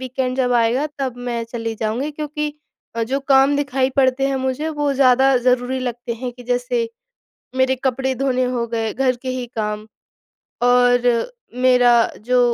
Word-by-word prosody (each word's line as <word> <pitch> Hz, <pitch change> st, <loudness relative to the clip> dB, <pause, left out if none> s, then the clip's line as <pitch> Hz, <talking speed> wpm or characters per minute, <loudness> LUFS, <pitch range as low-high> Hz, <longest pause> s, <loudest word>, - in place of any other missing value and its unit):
Weekend 255 Hz, 0 st, -3 dB
जब 250 Hz, -2 st, +1 dB
आएगा, 240 Hz, +5 st, +2 dB
तब 260 Hz, -3 st, -3 dB
मैं 235 Hz, -1 st, -2 dB
चली 230 Hz, -1 st, -5 dB
जाऊँगी। 225 Hz, +7 st, -2 dB
क्योंकि 300 Hz, 0 st, -4 dB, 0.5 s
अ, 230 Hz, -, 0 dB
जो 260 Hz, +5 st, -1 dB
काम 270 Hz, +1 st, +4 dB
दिखाई 270 Hz, -2 st, 0 dB
पड़ते 270 Hz, 0 st, +3 dB
हैं 270 Hz, -, -1 dB
मुझे, 265 Hz, +4 st, -2 dB
वो 295 Hz, -2 st, -1 dB
ज़्यादा 265 Hz, 0 st, +4 dB
ज़रूरी 250 Hz, +1 st, +2 dB
लगते 240 Hz, -1 st, -4 dB
हैं, 250 Hz, +2 st, -5 dB
कि 245 Hz, 0 st, -13 dB
जैसे 455 Hz, -, 0 dB, 0.7 s
मेरे 260 Hz, 0 st, +3 dB
कपड़े 265 Hz, +1 st, 0 dB
धोने 255 Hz, 0 st, 0 dB
हो 235 Hz, -2 st, -1 dB
गए, 225 Hz, -1 st, -2 dB
घर 260 Hz, -2 st, +1 dB
के 260 Hz, -, -5 dB
ही 255 Hz, -1 st, -3 dB
काम, 210 Hz, 0 st, -3 dB, 0.8 s
और 245 Hz, -, +3 dB, 0.3 s
मेरा 250 Hz, -1 st, +5 dB, 0.4 s
जो 250 Hz, 0 st, +3 dB
255 Hz, 165 wpm, -20 LUFS, 245-270 Hz, 0.8 s, मेरा